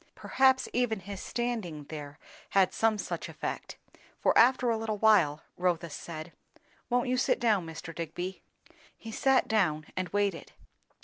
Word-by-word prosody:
Perhaps 265 -1 +3
even 230 -5 0
his 200 +1 -7
standing 225 -11 -3
there 145 -1 -8 0.3
had 195 -2 +3
some 225 -1 +2
such - - -4
effect; - - -5 0.4
for - - +2
after 250 0 +5
a - - +2
little 220 -1 -2
while, 195 -9 +4
Rotha 175 -2 0
said, 160 +2 -7 0.6
"Won't 245 +1 +1
you 255 0 +1
sit - - +2
down, 210 -7 +2
Mr. 165 +1 -8
Digby?" 175 +3 -5 0.6
He 225 - -9
sat 270 +3 +3
down, 165 -9 +1
and 185 -1 -2
waited. 200 -4 -1
195 Hz, 145 wpm, -30 LUFS, 165-230 Hz, 0.6 s, after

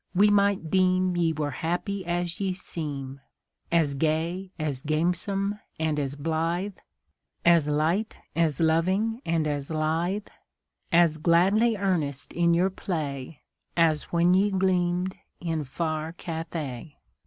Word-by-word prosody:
we 205 +3 +5
might 200 -5 +2
deem 185 -1 +3
Ye 170 -2 +2
were 150 -2 -2
happy 175 +7 -2
as 175 0 -2
ye 195 -2 0
seem 140 -7 -6 0.5
As 160 -4 +3
gay, 160 +6 -1
as 150 -5 -2
gamesome, 180 +6 0 0.2
and 155 -2 0
as 140 -1 -2
blithe, 165 +6 -1 0.7
As 170 -3 +5
light, 160 +9 0 0.2
as 165 -4 +1
loving, 185 +8 +2
and 165 -2 +1
as 145 -2 -3
lithe, 165 +6 0 0.7
As 165 -2 +4
gladly 195 +8 +4
earnest 165 -9 -1
in 170 -1 +3
your 185 +3 +2
play, 150 -6 -4 0.4
As 160 -2 +3
when 175 +1 +3
ye 195 +3 +4
gleamed 185 -1 +1 0.2
in 165 -3 -2
far 155 +3 -3
Cathay. 160 -5 -5
170 Hz, 125 wpm, -27 LUFS, 155-185 Hz, 0.7 s, we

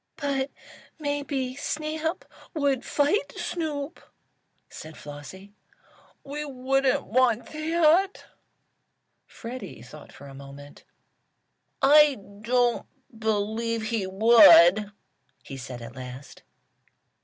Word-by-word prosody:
"But 280 -2 -2 0.5
maybe 285 -3 -3
Snap 310 +3 -3 0.3
would 280 -4 0
fight 295 +10 0
Snoop," 310 -2 -4 0.7
said 155 0 -11
Flossie. 150 +8 -11 0.7
"We 290 +2 -5
wouldn't 270 0 0
want 240 -1 +2
that." 330 +4 +2 1.0
Freddie 235 - -9
thought 150 +5 -13
for 140 - -14
a 140 - -11
moment. 140 +1 -13 1.0
"I 295 +1 +6 0.3
don't 245 +1 +1 0.3
believe 220 +1 -1
he 215 -5 -1
would," 205 -1 +7 0.5
he 135 - -9
said 125 -2 -8
at 115 +2 -10
last. 130 +1 -10
250 Hz, 90 wpm, -26 LUFS, 190-290 Hz, 1.0 s, would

